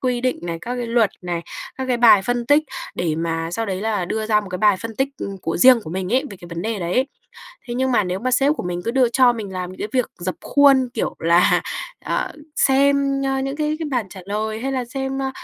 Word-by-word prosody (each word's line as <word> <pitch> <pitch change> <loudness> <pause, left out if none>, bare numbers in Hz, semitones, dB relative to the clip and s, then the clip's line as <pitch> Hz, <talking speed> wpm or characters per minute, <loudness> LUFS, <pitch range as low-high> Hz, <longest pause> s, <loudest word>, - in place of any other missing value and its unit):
quy 250 -2 0
định 255 0 0
này, 170 -1 -4
các 245 +1 -4
cái 245 -1 -3
luật 230 -3 +2
này, 175 -1 -3 0.3
các 265 - -3
cái 250 - +1
bài 230 -5 +6
phân 245 +2 -1
tích, 290 +3 +5 0.3
để 165 -3 -1
mà 165 0 -2
sau 225 +5 -2
đấy 190 -1 -3
là 210 -4 -1
đưa 220 +4 -3
ra 215 -1 +3
một 205 - -9
cái 180 - -3
bài 210 0 +4
phân 225 -1 -6
tích, 270 0 +1
ừm, 195 -1 -5
của 165 - -2
riêng 250 +4 +7
của 155 - -7
mình 185 +4 -3
ấy, 265 +3 +2
về 195 - -9
cái 175 -1 -12
vấn 170 +1 -4
đề 220 -2 -2
đấy. 185 +10 0 0.6
Thế 240 - -3
nhưng 260 0 0
mà, 210 - +3
nếu 180 +1 -2
mà 255 +3 -1
sếp 275 +4 +3
của - - -4
mình 175 0 -4
cứ - - 0
đưa 255 0 +3
cho 245 +1 +4
mình 215 -5 -6
làm 180 -1 -4
những 185 - -12
cái 210 - -3
việc 255 -2 0
rập 180 +1 -3
khuôn, 275 -3 +4
kiểu - - -2
là, 170 +2 +4 0.4
ờ, - - -1 0.2
xem, 275 0 +3
a, 270 0 0
những 270 +1 -3
cái 305 0 -1
cái 320 - -3
bản 245 -6 -1
trả 190 - -9
lời, 215 +2 -3
hay 270 +1 -2
là 255 -2 -1
xem, 270 +2 -4
ơ, 265 0 -1
230 Hz, 265 wpm, -21 LUFS, 185-265 Hz, 0.6 s, riêng